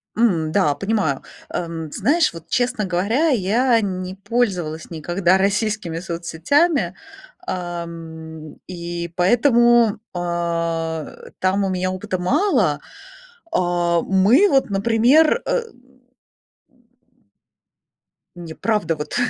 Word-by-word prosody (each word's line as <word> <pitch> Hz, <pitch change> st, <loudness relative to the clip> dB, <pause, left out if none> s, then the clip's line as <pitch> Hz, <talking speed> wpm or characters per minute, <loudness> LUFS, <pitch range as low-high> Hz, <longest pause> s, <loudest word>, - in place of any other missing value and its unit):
М, 175 Hz, -9 st, +2 dB
да, 155 Hz, -5 st, +2 dB
понимаю. 195 Hz, -6 st, -1 dB, 0.3 s
Эм, 165 Hz, -3 st, -4 dB
знаешь, 305 Hz, -, +2 dB
вот, 165 Hz, -1 st, -11 dB
честно 245 Hz, +2 st, 0 dB
говоря, 200 Hz, -, +1 dB
я 230 Hz, +1 st, +2 dB
не 185 Hz, -1 st, -4 dB
пользовалась 195 Hz, -7 st, -2 dB
никогда 175 Hz, +3 st, +1 dB
российскими 195 Hz, -3 st, -1 dB
соцсетями, 180 Hz, -, 0 dB, 0.5 s
эм, 165 Hz, -3 st, -6 dB
и 170 Hz, -1 st, -5 dB
поэтому, 235 Hz, +2 st, +4 dB, 0.2 s
а, 170 Hz, -2 st, -2 dB, 0.3 s
там 190 Hz, +2 st, +1 dB
у -, -, -1 dB
меня 185 Hz, 0 st, -1 dB
опыта 185 Hz, +1 st, -3 dB
мало. 360 Hz, -, +2 dB, 0.7 s
А, 175 Hz, -, +1 dB
мы 205 Hz, -, +4 dB
вот, 270 Hz, -4 st, +2 dB
например, 235 Hz, -, +3 dB
э -, -, +1 dB, 2.7 s
Не, 170 Hz, -2 st, -8 dB
правда, 205 Hz, -5 st, 0 dB
вот. 150 Hz, 0 st, -6 dB
185 Hz, 95 wpm, -21 LUFS, 170-225 Hz, 2.7 s, поэтому